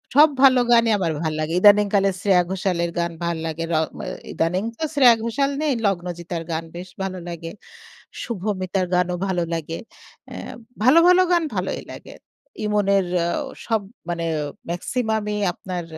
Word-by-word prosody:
সব 300 +2 +8
ভালো 260 -2 +7
গানই 230 -1 +5
আমার 170 -3 0
ভাল 160 -1 -1
লাগে। 155 +2 -2
ইদানিং 205 0 +7
কালের 195 -1 +2
শ্রেয়া 185 -3 +4
ঘোষালের 180 -3 -1
গান 170 0 -1
ভাল 170 -1 -1
লাগে। 160 +1 -4
র - - +3 0.2
ম - - -10 0.3
ইদানিং 180 +4 0 0.2
তো - - -3
শ্রেয়া 250 -5 +7
ঘোষাল 275 +5 0
নেই 305 -2 +1
লগ্নজিতার 175 -2 -2
গান 165 0 -2
বেশ 180 +2 -7
ভালো 185 -1 -4
লাগে। 165 -1 -6 0.7
শুভমিতার 190 -4 -2
গানও 180 0 +1
ভালো 180 -2 0
লাগে। 165 0 -4 0.5
এ্যা - - -8 0.3
ভালো, 265 +8 +7
ভালো 360 +1 +6
গান 345 -1 +3
ভালই - - -2
লাগে। - - -11 0.5
ইমনের 200 -2 +2
এ্যা 170 0 0 0.4
সব 225 -3 +1 0.3
মানে 170 -1 -2 0.5
মেক্সিমামই 220 +2 -2 0.2
আপনার 180 -1 -5
190 Hz, 155 wpm, -22 LUFS, 170-220 Hz, 0.7 s, সব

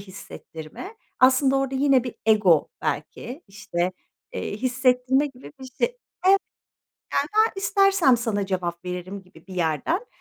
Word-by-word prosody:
hissettirme, 190 - -10 0.2
aslında 265 +1 +5
orada 270 0 -1
yine 265 -2 +3
bir 250 - -5
ego 210 -7 +4
belki, 270 +7 -4
işte, 185 -3 -3 0.4
eee, 205 - -4
hissettirme 255 +2 +2
gibi 270 -1 -12
bir - - -8
şey. 255 - -15
Evet. 485 +1 0 1.4
Yani, 435 0 +6
"Ben - - -4
istersem 390 - +4
sana 220 -4 -2
cevap 180 -2 -3
veririm." 180 +2 -6
gibi 180 -3 -20
bir 190 - -10
yerden, 180 - -1
250 Hz, 135 wpm, -24 LUFS, 185-270 Hz, 1.4 s, Yani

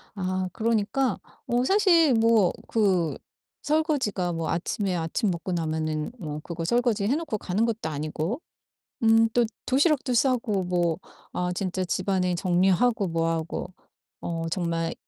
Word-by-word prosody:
아 185 -1 -2
그러니까 225 +2 0 0.3
뭐 240 +1 +1
사실 345 - +5
뭐 225 -4 +4 0.2
그 190 -7 +1 0.5
설거지가 290 - 0
뭐 165 -1 -3
아침에 185 +2 -1
아침 165 +5 -1
먹고 175 +2 -4
나면은 155 0 -2
뭐 150 -5 -5
그거 170 -1 -5
설거지 235 +2 +1
해 255 +8 +2
놓고 310 -10 -2
가는 205 +4 0
것도 225 -8 -2
아니고 155 - -3 0.6
음 225 0 +5
또 240 -1 +4 0.2
도시락도 275 -1 +2
싸고 235 -6 +1
뭐 175 -2 +1 0.4
아 180 0 -1
진짜 185 0 -2
집안에 185 0 0
정리하고 190 +5 +2
뭐 165 -1 0
하고 165 +2 -3 0.5
어 165 -1 -3
정말 165 -2 -1
190 Hz, 265 characters per minute, -26 LUFS, 170-230 Hz, 0.6 s, 사실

